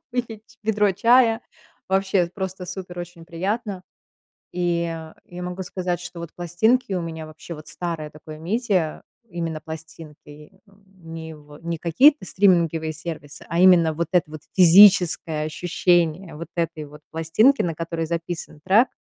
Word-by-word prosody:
выпить 225 Hz, -2 st, -5 dB
ведро 210 Hz, -2 st, +2 dB
чая- 230 Hz, +2 st, +4 dB, 0.5 s
вообще 190 Hz, -1 st, +2 dB
просто 190 Hz, -2 st, -5 dB
супер, 180 Hz, -1 st, -7 dB
очень 175 Hz, -1 st, -8 dB
приятно. 190 Hz, +3 st, -3 dB, 0.7 s
И 175 Hz, -1 st, 0 dB, 0.5 s
я 180 Hz, 0 st, -9 dB
могу 180 Hz, +1 st, -5 dB
сказать, 180 Hz, -1 st, -3 dB
что 175 Hz, -1 st, -8 dB
вот 170 Hz, -1 st, -8 dB
пластинки 200 Hz, +8 st, +1 dB
у 180 Hz, -, -1 dB
меня 160 Hz, -1 st, -6 dB
вообще, 155 Hz, +2 st, -10 dB
вот 155 Hz, -1 st, -11 dB
старое 165 Hz, -4 st, -4 dB
такое 155 Hz, +1 st, -11 dB
media 185 Hz, -2 st, -1 dB, 0.3 s
именно 165 Hz, -3 st, -4 dB
пластинки, 160 Hz, +1 st, -11 dB
не 185 Hz, -5 st, -11 dB
в 150 Hz, 0 st, -15 dB
не 170 Hz, 0 st, -3 dB
какие-то 255 Hz, -, +4 dB
стриминговые 170 Hz, -5 st, +2 dB
сервисы, 155 Hz, -2 st, -8 dB
а 170 Hz, -, -1 dB
именно 170 Hz, -4 st, +6 dB
вот 170 Hz, +1 st, -3 dB
это 175 Hz, -4 st, +2 dB
вот 155 Hz, -1 st, -9 dB
физическое 175 Hz, -4 st, +6 dB
ощущение 170 Hz, +1 st, 0 dB
вот 170 Hz, +2 st, -8 dB
этой 165 Hz, -2 st, -2 dB
вот 150 Hz, +1 st, -12 dB
пластинки, 165 Hz, -, +3 dB
на 170 Hz, -2 st, -1 dB
которой 165 Hz, 0 st, -3 dB
записан 165 Hz, -1 st, -4 dB
трек, 210 Hz, +7 st, +5 dB
175 Hz, 140 wpm, -23 LUFS, 160-190 Hz, 0.7 s, именно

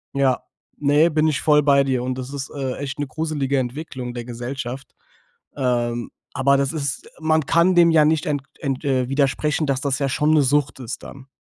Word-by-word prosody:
Ja. 135 Hz, -2 st, +2 dB, 0.4 s
Ne, 145 Hz, +3 st, +4 dB
bin 155 Hz, 0 st, +2 dB
ich 145 Hz, -2 st, 0 dB
voll 150 Hz, -1 st, +4 dB
bei 140 Hz, -1 st, +5 dB
dir. 130 Hz, -2 st, 0 dB
Und 130 Hz, 0 st, -3 dB
das 130 Hz, +2 st, -6 dB
ist, 135 Hz, -1 st, -5 dB
äh, 135 Hz, -2 st, -3 dB
echt 145 Hz, +1 st, -5 dB
'ne 145 Hz, -, -2 dB
gruselige 145 Hz, -2 st, -1 dB
Entwicklung 130 Hz, -1 st, -5 dB
der 120 Hz, -1 st, -5 dB
Gesellschaft. 125 Hz, +2 st, -6 dB, 0.6 s
Ähm, 120 Hz, -3 st, -1 dB, 0.2 s
aber 140 Hz, +1 st, +3 dB
das 140 Hz, 0 st, 0 dB
ist 140 Hz, -3 st, -4 dB
man 155 Hz, -2 st, +1 dB
kann 170 Hz, +2 st, +4 dB
dem 170 Hz, -1 st, +6 dB
ja 160 Hz, -2 st, +5 dB
nicht 155 Hz, 0 st, +1 dB
ent 145 Hz, -2 st, -1 dB, 0.2 s
ent 135 Hz, 0 st, -3 dB
äh, 130 Hz, -3 st, +1 dB
widersprechen, 145 Hz, +3 st, +1 dB
dass 135 Hz, -2 st, 0 dB
das 140 Hz, -2 st, -1 dB
ja 140 Hz, -, 0 dB
schon 150 Hz, +3 st, +2 dB
'ne 150 Hz, -, +5 dB
Sucht 145 Hz, 0 st, +1 dB
ist 125 Hz, 0 st, -6 dB
dann. 135 Hz, -1 st, -11 dB
140 Hz, 200 wpm, -22 LUFS, 130-150 Hz, 0.6 s, dem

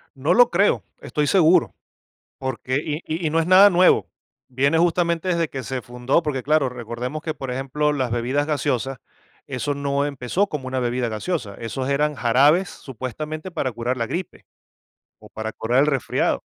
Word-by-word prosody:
No -, -, +1 dB
lo -, -, +6 dB
creo, -, -, +2 dB, 0.2 s
estoy 150 Hz, -2 st, -1 dB
seguro, 170 Hz, 0 st, +4 dB, 0.6 s
porque, 130 Hz, -1 st, -3 dB
y 150 Hz, -, -2 dB
y 160 Hz, +2 st, -2 dB
y -, -, 0 dB
no 165 Hz, +1 st, +2 dB
es 160 Hz, -, -1 dB
nada 190 Hz, +3 st, +8 dB
nuevo, 180 Hz, 0 st, +4 dB, 0.4 s
viene 140 Hz, +5 st, +1 dB
justamente 170 Hz, 0 st, +1 dB
desde 170 Hz, -2 st, +1 dB
que 135 Hz, -2 st, -6 dB
se 130 Hz, 0 st, -4 dB
fundó, 125 Hz, +7 st, 0 dB
porque, 140 Hz, -5 st, -2 dB
claro, 150 Hz, -1 st, +2 dB
recordemos 125 Hz, +4 st, -5 dB
que, 160 Hz, -1 st, -3 dB
por 135 Hz, -3 st, -6 dB
ejemplo, 135 Hz, +4 st, -1 dB
las 130 Hz, -4 st, -1 dB
bebidas 125 Hz, +5 st, 0 dB
gaseosa, 135 Hz, -3 st, -1 dB, 0.5 s
eso 140 Hz, +2 st, -2 dB
no 140 Hz, 0 st, -1 dB
empezó 140 Hz, +7 st, -1 dB
como 150 Hz, -8 st, -5 dB
una 130 Hz, 0 st, -2 dB
bebida 120 Hz, 0 st, -1 dB
gaseosa, 110 Hz, -, -3 dB
esos 130 Hz, +5 st, -4 dB
eran 150 Hz, +2 st, +1 dB
jarabes 140 Hz, +9 st, +3 dB
supuestamente 150 Hz, -, -6 dB
para 145 Hz, -7 st, -2 dB
curar 120 Hz, +3 st, -2 dB
la 115 Hz, -2 st, -2 dB
gripe 180 Hz, +9 st, -5 dB, 0.7 s
o -, -, -15 dB
para 110 Hz, 0 st, -5 dB
curar 120 Hz, +5 st, +1 dB
el 145 Hz, -, +4 dB
resfriado. 135 Hz, -4 st, 0 dB
140 Hz, 175 wpm, -22 LUFS, 125-155 Hz, 0.7 s, nada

